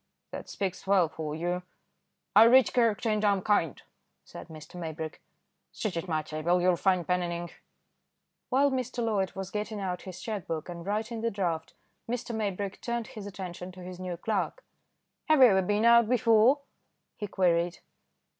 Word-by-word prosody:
"That - - -7
speaks 190 -1 -4
well 190 -4 +4
for 155 -1 -5
you." 175 +2 -2 0.7
"I 220 +2 +9
read 255 +2 +6
character, 230 -2 +2
and 215 0 0
I'm 200 -3 +2
kind," 170 - +1 0.5
said - - -10
Mr. 155 -2 -12
Maybrick. 160 -1 -6 0.5
"Sit 215 -5 -3
at 165 +2 -3
my 155 -2 0
table, 155 +4 0
you'll 180 0 +3
find 180 -1 +1
pen 180 0 +2
and 175 -1 -2
ink." 170 0 -6 0.9
While 275 +2 +3
Mr. 255 -2 -2
Loyd 200 -4 0
was 190 0 -5
getting 210 0 -3
out 180 -2 -3
his 185 -2 -9
cheque 210 -1 -5
book 160 +1 -4
and 170 -1 -7
writing 220 +2 -2
the 230 - +1
draft, 170 -6 -3 0.3
Mr. 240 0 -3
Maybrick 200 -3 -3
turned 235 -1 -3
his 215 -6 -8
attention 180 -1 -7
to 180 0 -11
his 180 0 -8
new 180 -2 -4
clerk. 220 - -2 0.6
"Have 310 -1 +4
you 255 -3 +8
ever 190 -2 +4
been 205 +4 +1
out 235 -1 +6
before?" 240 +3 +4 0.5
he 210 - -5
queried. 175 -2 +1
195 Hz, 175 wpm, -29 LUFS, 175-220 Hz, 0.9 s, I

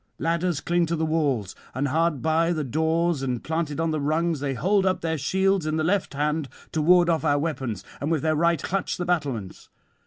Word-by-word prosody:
Ladders 170 -1 0
cling 175 0 +1
to 170 - 0
the 160 0 0
walls; 145 - 0 0.2
and 140 +2 0
hard 160 -1 +1
by 165 +2 +2
the 155 -2 -2
doors 160 +3 0
and 125 -3 -2
planted 160 -2 -2
on 165 -1 +1
the 155 -1 -1
rungs 160 +2 0
they 135 -1 -2
hold 195 - +2
up 185 -1 +1
their 160 -1 -1
shields 190 +4 +1
in 155 0 0
the 155 - 0
left 180 -2 0
hand 150 0 -1 0.2
to 160 - 0
ward 175 +2 +5
off 165 -2 +1
our 145 -2 +3
weapons, 135 - -3 0.2
and 145 - -1
with 160 -3 0
their 155 -1 +2
right 170 0 +2
clutch 195 0 -2
the 175 - -3
battlements. 140 - -2
160 Hz, 215 wpm, -25 LUFS, 145-170 Hz, 0.2 s, ward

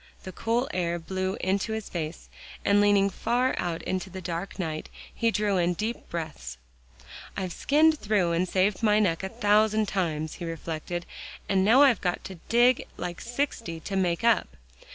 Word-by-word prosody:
The 185 - -7
cool 230 +7 0
air 175 -1 0
blew 185 +3 -3
into 195 +4 0
his 220 -2 -4
face, 165 -2 -5 0.4
and 205 0 +5
leaning 205 -1 +4
far 240 +6 0
out 170 -2 -2
into 185 0 -3
the 190 +1 -7
dark 175 +1 -5
night, 160 -5 -4 0.2
he 230 - +1
drew 210 -3 +1
in 175 0 +1
deep 220 +5 -4
breaths. 155 - -5 0.8
"I've 185 -3 -3
skinned 310 +2 +3
through 205 -5 +1
and 175 +2 0
saved 190 +2 +1
my 210 -2 +4
neck 185 -6 +2
a 190 - -4
thousand 215 0 +3
times," 160 -5 -1
he - - -3
reflected, 165 +1 -4 0.4
"and 190 -1 +2
now 240 +8 +6
I've 260 -6 +4
got 180 -1 -1
to 190 -3 -9
dig 240 +2 +4
like 175 0 -5
sixty 235 - -3
to 195 - -5
make 180 0 0
up. 230 -1 +2
190 Hz, 175 wpm, -27 LUFS, 175-220 Hz, 0.8 s, now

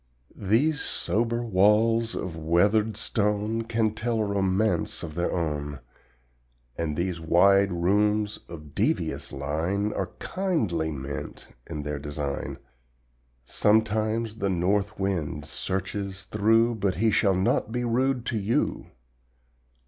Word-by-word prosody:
These 130 +10 +2
sober 115 +2 0
walls 110 +3 +3
of 90 -3 -4
weathered 100 +7 +2
stone 105 0 0
Can 115 -1 0
tell 115 +1 -1
a 110 - +1
romance 100 -1 0
of 80 -3 -6
their 85 +2 -1
own, 75 -4 -2 1.0
And 75 -3 -2
these 85 -1 -1
wide 95 +4 +4
rooms 105 +4 +1
of 75 -4 -10
devious - - -1
line 80 +9 -1
Are - - -2
kindly 110 - -1
meant 70 -2 -6 0.2
in 75 -3 -4
their 75 0 -3
design. 75 -1 -4 0.9
Sometimes 110 - +1
the 100 -3 -1
north 100 +4 0
wind 85 -7 -2
searches 95 +3 -3
through, 115 +3 +3
But 100 -3 0
he 110 +3 +2
shall 100 -2 +3
not 95 +3 +1
be 125 +1 -1
rude 125 +1 +1
to 115 -4 -1
you. 105 +4 -1
100 Hz, 120 wpm, -26 LUFS, 85-110 Hz, 1.0 s, wide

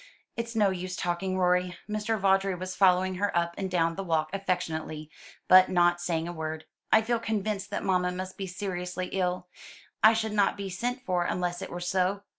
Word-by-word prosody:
It's 230 0 -4
no 205 -3 +3
use 185 0 -4
talking, 180 +2 -2
Rorie." 180 -1 +1
Mr. 215 +1 -1
Vawdrey 195 -1 +2
was 185 +1 -5
following 185 -1 +3
her 205 -3 +1
up 170 0 0
and 190 -1 -3
down 165 -2 +1
the 195 - -5
walk 160 -3 0
affectionately, 160 -5 -3 0.4
but 185 0 +8
not 175 -1 +3
saying 170 -2 -1
a 175 - -5
word. 160 -1 -5 0.3
"I 220 - +6
feel 235 +1 0
convinced 215 -2 -2
that - - -3
mamma 180 -1 +1
must 185 +1 -6
be 195 - -5
seriously 180 -1 -4
ill; 180 -1 -1 0.5
I 220 +1 +8
should 220 -1 -1
not 205 -1 +2
be 195 -1 -5
sent 245 +7 -3
for 180 -4 0
unless 175 0 -2
it 190 - -5
were 175 - -5
so. 185 +3 0
185 Hz, 195 wpm, -28 LUFS, 175-195 Hz, 0.5 s, but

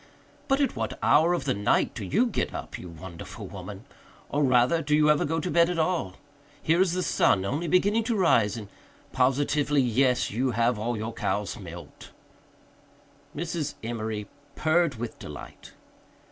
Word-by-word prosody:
But 270 0 +2
at 280 - +1
what - - -3
hour 170 +3 +4
of - - -4
the 135 - +1
night 100 0 +1
do 110 - -6
you 160 - +2
get 235 - -2
up, - - -6
you 90 - -9
wonderful 85 +1 -9
woman? - - -9 0.4
Or 145 +1 +1
rather 130 +5 +3
do 150 -1 +1
you 150 0 +5
ever 150 - +2
go 160 +2 -1
to 180 - -3
bed 170 0 +4
at 180 - -2
all? 160 - 0 0.4
Here 165 +3 +2
is 185 -3 +2
the 185 0 -1
sun 95 - +2
only 145 - -2
beginning 205 +6 +3
to 230 -1 0
rise 120 - +3
and 105 -3 -7 0.4
positively 145 +3 +2
yes, 125 +1 +2
you 125 +5 0
have 115 -1 +2
all 115 +2 -2
your 110 +2 -4
cows 105 -2 -2
milked." 85 -3 -10 1.3
Mrs. 160 -2 -3
Emory 110 -2 -4 0.3
purred 160 -2 +2
with 115 0 -6
delight. 75 -3 -10
135 Hz, 170 wpm, -27 LUFS, 110-170 Hz, 1.3 s, you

